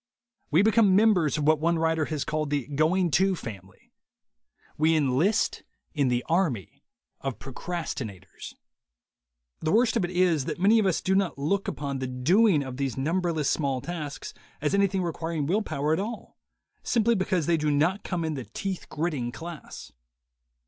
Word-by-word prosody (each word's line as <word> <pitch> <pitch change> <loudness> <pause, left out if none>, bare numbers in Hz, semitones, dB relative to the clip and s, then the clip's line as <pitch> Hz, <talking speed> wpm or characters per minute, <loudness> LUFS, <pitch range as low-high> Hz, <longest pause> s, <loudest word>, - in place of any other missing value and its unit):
We 165 +6 +4
become 215 -3 +4
members 190 -9 +3
of 150 - -1
what 155 0 +4
one 170 +2 +1
writer 160 -1 +1
has 150 -2 -3
called 155 -1 -2
the 145 -4 -1
"Going 165 +5 +1
To" 190 +4 +3
family. 95 - -10 0.8
We 160 +2 +3
enlist 155 - +1 0.3
in 145 -4 +1
the 125 0 0
Army 160 - -1 0.4
of 135 -3 -4
the - - -15
Procrastinators. 120 - -6 1.0
The 155 - -1
worst 235 +3 +3
of 225 - +1
it 175 - -1
is, 175 -6 +2
that - - -4
many 210 +5 +5
of 205 - +2
us 185 - +1
do 190 - 0
not 190 -5 +1
look 190 +8 -1
upon 140 -2 -3
the 130 - -3
doing 155 - +3
of 130 -1 -7
these 135 -4 -2
numberless 165 +1 0
small 140 -4 0
tasks 145 -3 -6 0.3
as 150 +3 -1
anything 195 -1 +2
requiring 165 -2 -3
will 195 +9 +1
power 155 -5 -1
at 160 - 0
all, 220 +4 -6 0.5
simply 235 -1 +2
because 185 -5 0
they 170 - +3
do 155 -1 0
not 160 +7 +1
come 175 -3 -2
in 160 - -2
the 130 -4 -5
teeth 195 -2 -5
gritting 150 -7 -2
class. 165 +3 -9
160 Hz, 170 wpm, -27 LUFS, 140-185 Hz, 1.0 s, many